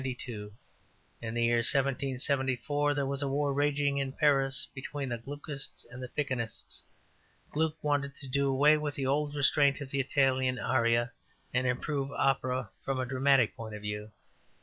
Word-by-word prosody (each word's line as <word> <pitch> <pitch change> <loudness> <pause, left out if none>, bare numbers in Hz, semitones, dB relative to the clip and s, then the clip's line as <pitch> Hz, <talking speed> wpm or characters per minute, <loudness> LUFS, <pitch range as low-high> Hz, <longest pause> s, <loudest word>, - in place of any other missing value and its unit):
In 115 -2 -7
the 120 - +2
year 120 0 +4
1774 140 +2 +1
there 140 -1 0
was 140 +1 -1
war 140 +1 +1
raging 145 0 +1
in 135 -1 -2
Paris 135 -2 +2
between 140 0 -4
the 120 -1 -2
Gluckists 140 +2 -7
and 125 0 -8 0.2
Piccinists. 130 -6 -2 0.7
Gluck 155 0 +1
wanted 140 -1 0
to 135 - -6
do 140 +2 +1
away 145 +3 +5
with 150 -1 -3
the 135 - -2
old 145 +2 0
restraint 140 0 +4
of 140 -2 -7
the 140 - 0
Italian 130 -2 +2
aria, 120 -1 +2 0.4
and 125 +1 +2
improve 135 +2 -1
opera 130 -5 +1
from 135 -1 -1
a 130 - 0
dramatic 130 -1 +3
point 110 -2 -7
of 105 - -9
view. 105 +1 -4
135 Hz, 150 wpm, -31 LUFS, 125-145 Hz, 0.7 s, away